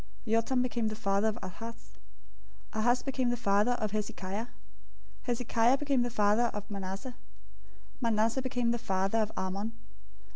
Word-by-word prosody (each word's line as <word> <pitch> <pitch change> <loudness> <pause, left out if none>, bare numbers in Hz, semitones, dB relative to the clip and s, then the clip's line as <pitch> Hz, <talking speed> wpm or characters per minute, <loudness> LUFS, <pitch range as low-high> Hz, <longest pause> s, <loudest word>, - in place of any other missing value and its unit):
Jotham 230 +3 +2
became 235 -2 0
the 215 - -2
father 200 0 +1
of 220 0 0
Ahaz. 225 +5 -8 0.8
Ahaz 240 +3 +2
became 260 -2 0
the 240 - 0
father 210 +1 +3
of 215 -4 -2
Hezekiah. 205 0 -3
001:010 - - -19 0.8
Hezekiah 240 +1 +3
became 275 -3 +1
the 245 - +1
father 215 +1 +3
of 210 +1 -6
Manasseh. 195 +5 -5 0.9
Manasseh 230 +2 +2
became 245 -2 0
the 240 - 0
father 195 +2 +1
of 215 0 +1
Amon. 195 +4 -2
225 Hz, 145 wpm, -31 LUFS, 205-245 Hz, 0.9 s, father